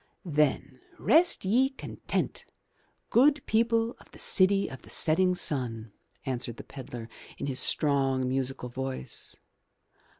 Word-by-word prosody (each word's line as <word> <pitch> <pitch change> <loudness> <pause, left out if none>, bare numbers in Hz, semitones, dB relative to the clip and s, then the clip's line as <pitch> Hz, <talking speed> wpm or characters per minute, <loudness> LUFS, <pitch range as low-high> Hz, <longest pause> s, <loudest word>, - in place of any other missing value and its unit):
"Then 145 -4 0 0.2
rest 330 - +3
ye 250 +7 +3
content, 270 - -4 0.7
good 280 +3 +4
people 230 +1 +1
of - - -19
the - - -14
city 195 +1 +3
of 130 - -9
the - - -16
setting 180 +3 +2
sun," 120 - -2 0.3
answered 120 -3 -3
the - - -8
pedlar, 125 -4 -8 0.3
in - - -4
his 135 -2 -2
strong, 135 -4 +2
musical 130 -1 -2
voice. 130 - -6
140 Hz, 125 wpm, -28 LUFS, 130-200 Hz, 0.7 s, good